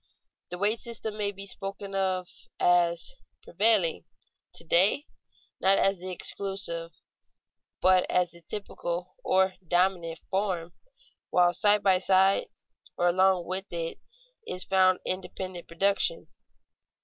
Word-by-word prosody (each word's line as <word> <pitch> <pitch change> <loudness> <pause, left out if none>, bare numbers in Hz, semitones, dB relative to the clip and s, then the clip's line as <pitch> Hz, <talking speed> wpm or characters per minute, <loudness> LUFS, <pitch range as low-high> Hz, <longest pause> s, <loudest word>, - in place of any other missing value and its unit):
The 180 - -5
wage 210 +4 +1
system 225 -2 -5
may 205 -1 -1
be 195 0 -7
spoken 195 0 -5
of 185 -2 -1 0.3
as 175 - +2 0.3
prevailing 195 - +3 0.5
to - - -3
day 190 - +4 0.5
not 195 +1 +5
as 195 -1 +2
the 185 +1 -7
exclusive, 185 -2 -2 0.9
but 185 0 +4
as 180 -1 +1
the 170 +1 -16
typical, 175 -1 -5
or 190 0 +2
dominant, 175 -1 0
form, 185 -4 -2 0.6
while 175 -1 +3
side 205 +1 +3
by 190 -2 +4
side 190 +1 +3 0.5
or 175 - +3
along 185 0 +2
with 190 +2 -5
it 165 -1 -4 0.5
is 180 - +2
found 185 -1 +3
independent 185 -1 -4
production. 200 - 0
185 Hz, 120 wpm, -27 LUFS, 175-195 Hz, 0.9 s, not